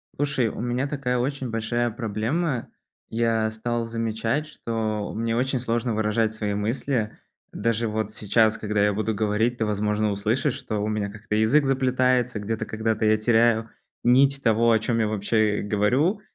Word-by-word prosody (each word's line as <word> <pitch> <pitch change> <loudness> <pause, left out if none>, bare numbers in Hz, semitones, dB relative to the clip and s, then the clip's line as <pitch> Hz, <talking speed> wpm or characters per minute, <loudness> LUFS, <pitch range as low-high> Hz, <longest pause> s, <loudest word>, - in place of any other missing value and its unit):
Слушай, 140 -4 0
у - - -8
меня 125 +3 -1
такая 135 -4 -1
очень 130 0 -2
большая 115 +2 -1
проблема. 120 +6 -2 0.4
Я 115 -1 +1
стал 115 +1 -2
замечать, 115 +4 -1
что 110 -7 -3
мне 115 +1 -1
очень 130 +2 0
сложно 120 -1 -1
выражать 110 +1 +1
свои 105 -2 -2
мысли. 110 +2 -1 0.4
Даже 115 0 0
вот 110 -1 -2
сейчас, 110 +1 +2
когда 105 -1 0
я 105 0 +3
буду 110 +2 -1
говорить, 110 +3 0
ты, 110 - 0
возможно, 105 0 0
услышишь, 115 +7 0
что 110 -3 -4
у - - -1
меня 105 -1 -1
как-то 105 +1 -5
язык 110 +7 +3
заплетается, 130 -3 +1
где-то 110 +2 -3
когда-то 110 0 -1
я 110 0 +4
теряю 115 0 +3 0.3
нить 135 +3 +4
того, 115 0 +4
о 110 - +4
чём 115 +1 -1
я 110 - +2
вообще, 105 0 +1
э, - - -3
говорю. 125 - +1
115 Hz, 165 wpm, -24 LUFS, 110-125 Hz, 0.4 s, я